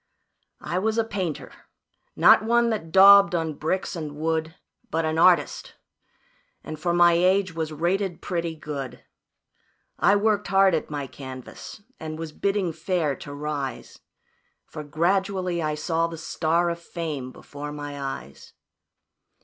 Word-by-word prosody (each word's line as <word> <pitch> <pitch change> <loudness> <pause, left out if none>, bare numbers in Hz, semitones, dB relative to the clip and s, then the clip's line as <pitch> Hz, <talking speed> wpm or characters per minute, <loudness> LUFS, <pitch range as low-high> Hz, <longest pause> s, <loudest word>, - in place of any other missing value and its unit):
"I 170 +4 -2
was 220 +3 0
a 230 - +3
painter 190 -8 -4 0.6
not - - +6
one 235 +1 +2
that 185 -7 -4
daubed 195 +1 +8
on 160 -2 -1
bricks 165 +6 -2
and 155 -3 -6
wood, 160 +1 -2 0.3
But 165 +1 -1
an 160 +1 -1
artist, 180 +1 +3 0.9
and 155 -1 -7
for 175 +2 0
my 175 0 +5
age, 185 +2 +2
was 160 -1 -3
rated 175 +3 -1
pretty 170 -2 -3
good. 145 -4 -7 0.9
I 200 - +5
worked 210 0 +1
hard 195 -1 +4
at 160 - -1
my 145 -2 -4
canvas, 130 - -10 0.2
and 155 0 -6
was 160 -1 -6
bidding 195 0 -1
fair 160 -3 -1
to 145 - -9
rise, 145 -2 -5 0.7
For 150 - -8
gradually 180 +3 0
I 155 -1 -1
saw 165 +2 0
the 165 0 -8
star 165 +2 0
of 170 - -5
fame 155 -7 -5
before 145 +2 -9
my 145 -1 -6
eyes. 135 - -7
165 Hz, 140 wpm, -25 LUFS, 150-190 Hz, 0.9 s, daubed